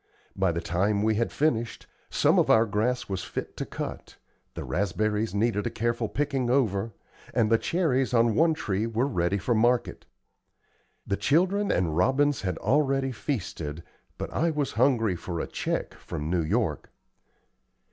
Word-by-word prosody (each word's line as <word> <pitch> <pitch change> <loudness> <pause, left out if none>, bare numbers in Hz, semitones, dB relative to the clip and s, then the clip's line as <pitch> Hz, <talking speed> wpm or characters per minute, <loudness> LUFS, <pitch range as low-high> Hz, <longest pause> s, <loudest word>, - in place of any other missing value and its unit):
By 95 -2 +2
the 85 0 -3
time 100 +5 0
we 110 0 +3
had 115 +2 0
finished, 120 -6 -1 0.2
some - - +3
of - - +2
our 110 +1 +6
grass 115 +4 -1
was 95 -2 -3
fit - - -6
to - - -4
cut, - - -6 0.4
the - - -5
raspberries 105 +3 -1
needed 105 -1 +1
a - - 0
careful 115 -1 -1
picking 135 -2 -1
over, 115 -5 +1 0.4
and 115 -2 +2
the 115 - +5
cherries 135 -8 +1
on 115 -2 +3
one 160 +6 +3
tree 105 -5 -1
were 115 +3 0
ready 95 -7 0
for 120 +5 0
market. 120 +2 +1 1.0
The 100 - -1
children 185 - +2
and 85 -4 0
robins 135 - +2
had 90 -2 -2
already 135 -1 +1
feasted, 85 - -4 0.3
but - - -5
I 170 - +1
was 150 -3 -1
hungry 115 -5 +2
for 85 0 -5
a - - -2
check - - -3
from 75 +2 -5
New 90 -2 +2
York. 80 - -1
115 Hz, 160 wpm, -27 LUFS, 100-130 Hz, 1.0 s, our